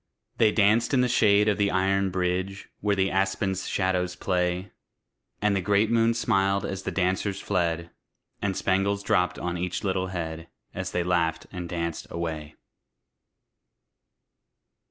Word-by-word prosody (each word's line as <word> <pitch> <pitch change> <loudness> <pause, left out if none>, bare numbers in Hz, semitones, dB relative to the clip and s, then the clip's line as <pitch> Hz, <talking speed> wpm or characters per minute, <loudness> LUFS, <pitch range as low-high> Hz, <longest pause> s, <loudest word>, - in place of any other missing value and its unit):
They 110 -2 +5
danced 110 +5 +3
in 125 - +4
the 125 - +3
shade 105 -3 +4
of 105 -1 +1
the 100 -1 +3
iron 95 +1 +1
bridge, 95 +2 -2
Where 105 -1 +1
the 95 0 +1
aspen's 95 0 0
shadows 90 -1 0
play; 90 +1 -1 0.7
And 105 -1 +3
the 95 - +1
great 105 +3 +2
moon 115 0 +3
smiled 100 -4 +1
as 95 0 -4
the - - -3
dancers 95 +1 0
fled, 85 -4 -1 0.5
And 95 -2 -1
spangles 100 +1 +1
dropped 90 -2 +1
on 90 0 -3
each 90 +3 -3
little 95 -2 0
head, 80 -2 -5 0.3
As - - -4
they 90 - 0
laughed 85 -2 0
and 90 -2 -6
danced 85 -2 -3
away. 80 -3 -5
95 Hz, 145 wpm, -26 LUFS, 90-100 Hz, 0.7 s, They